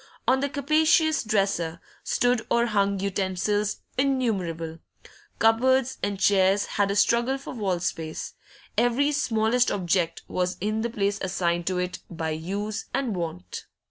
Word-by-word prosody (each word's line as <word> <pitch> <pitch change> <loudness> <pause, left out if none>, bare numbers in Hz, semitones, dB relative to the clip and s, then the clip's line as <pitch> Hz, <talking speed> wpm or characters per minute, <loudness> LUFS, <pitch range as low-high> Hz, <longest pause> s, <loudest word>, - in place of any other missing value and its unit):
On 265 - +4
the 280 +1 -1
capacious 310 +3 +3
dresser 195 -6 0 0.2
stood 245 -2 +1
or 235 0 +3
hung 200 -3 +1
utensils 200 +2 -1 0.2
innumerable; 190 - -1 0.6
cupboards 260 +3 +3
and 200 -1 -2
chairs 195 0 +3
had 200 -1 0
a 200 - 0
struggle 235 +5 +3
for 275 - -8
wall 195 -7 -1
space; 160 -2 -4 0.4
every 245 +5 +2
smallest 245 -3 +2
object 175 -3 0
was 180 0 -1
in 215 +3 -1
the 235 - -1
place 205 -2 -1
assigned 175 -2 -1
to 185 -1 0
it 180 0 -2
by 160 -2 -3
use 200 +7 -3
and 245 -7 -1
wont. 125 - -5
205 Hz, 140 wpm, -26 LUFS, 180-240 Hz, 0.6 s, On